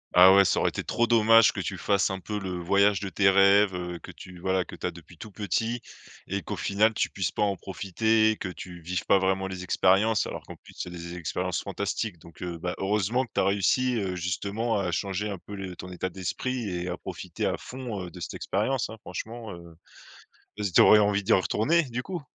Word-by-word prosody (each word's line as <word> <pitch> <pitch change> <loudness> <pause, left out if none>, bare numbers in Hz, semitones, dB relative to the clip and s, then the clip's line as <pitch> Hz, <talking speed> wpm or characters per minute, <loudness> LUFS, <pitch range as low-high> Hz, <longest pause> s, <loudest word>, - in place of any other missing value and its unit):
Ah 95 +2 +9
ouais, 100 0 +7
ça 90 - +2
aurait - - +2
été - - -5
trop 120 - +1
dommage 115 -1 +6
que 100 - -5
tu 95 0 -3
fasses 100 +1 +1
un 95 0 -4
peu 105 +3 -4
le 95 -2 -4
voyage 100 +1 +3
de 100 - -4
tes 95 0 +3
rêves, 100 0 +5
heu, 90 -1 -5
que - - -11
tu 90 -2 -12
voilà, 95 0 0
que - - -10
tu - - -3
as - - -1
depuis 85 -1 -14
tout 110 - -8
petit 115 +4 -2 0.4
et 100 +1 -3
qu'au - - -5
final 110 +2 +2
tu - - 0
puisses 90 -2 -1
pas - - -1
en 100 -1 +1
profiter, 110 +4 +1
que 95 - -4
tu 90 -1 -9
vives 90 +2 -3
pas 100 - +4
vraiment 95 0 0
les 95 -1 -6
expériences 100 +5 +3
alors - - -6
qu'en - - -9
plus - - -17
c'est 90 - -5
des 85 0 -7
expériences 90 +2 -2
fantastiques, 105 -6 -3
donc 85 +1 -16
heu, 85 -1 -4
bah, 90 +2 -3
heureusement 105 +5 +1
que 125 - -10
tu - - +2
as - - +3
réussi, 115 +6 +2
heu, 95 -3 -2
justement 100 +6 -2
à 90 -2 -1
changer 100 +3 -2
un 100 - -4
peu 100 - -12
le 95 -2 -6
ton 90 +1 -9
état 90 +1 -3
d'esprit 110 +6 -3
et 90 0 -3
à 90 - -3
profiter - - -5
à - - 0
fond, 125 -6 -6
heu, - - -8
de 90 - -12
cette 80 - -6
expérience, 125 +6 -1
hein, 110 - -9
franchement, 110 +4 -7
heu, 85 -1 -12 0.8
et 105 - -2
z 95 - -1
tu - - +8
aurais 105 - +8
envie 100 -1 +2
d'y - - +1
retourner, 110 - +3
du 125 -1 -4
coup? 180 -5 -5
95 Hz, 235 wpm, -27 LUFS, 90-110 Hz, 0.8 s, Ah